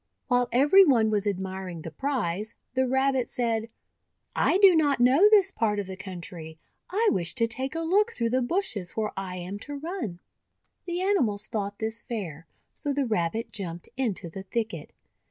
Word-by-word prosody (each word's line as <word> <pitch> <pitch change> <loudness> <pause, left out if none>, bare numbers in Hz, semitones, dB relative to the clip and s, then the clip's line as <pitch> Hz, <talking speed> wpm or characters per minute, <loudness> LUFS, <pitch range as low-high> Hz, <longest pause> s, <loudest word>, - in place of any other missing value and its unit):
While 245 -1 +2
every 290 +10 +7
one 235 - +4
was 210 -1 +1
admiring 190 -3 -4
the 165 - -6
prize, 220 - -2 0.2
the 260 0 +1
Rabbit 265 0 +1
said: 230 -2 -1 0.3
— - - -49
'I - - +3
do 390 -3 +7
not 290 -5 +3
know 270 +12 +6
this 400 -3 +5
part 215 -3 0
of 205 - -2
the 190 0 -7
country. 175 -4 -8 0.3
I 430 +4 +2
wish 175 -3 0
to 235 -3 +2
take 260 +6 -4
a 330 - -1
look 400 +7 +2
through 230 - -1
the 255 +1 +2
bushes 240 - -2
where 215 -1 0
I 190 -1 -4
am 185 +3 -6
to 290 +6 -7
run." 300 - -5 0.7
The 350 +1 -2
animals 245 - +1
thought 205 -2 -3
this 225 +1 -3
fair, 170 - -6 0.3
so 290 - -3
the 280 -1 0
Rabbit 220 0 -1
jumped 175 -4 -6
into 225 -9 -2
the 180 +4 -7
thicket. 190 -5 -4
230 Hz, 180 wpm, -27 LUFS, 190-275 Hz, 0.7 s, every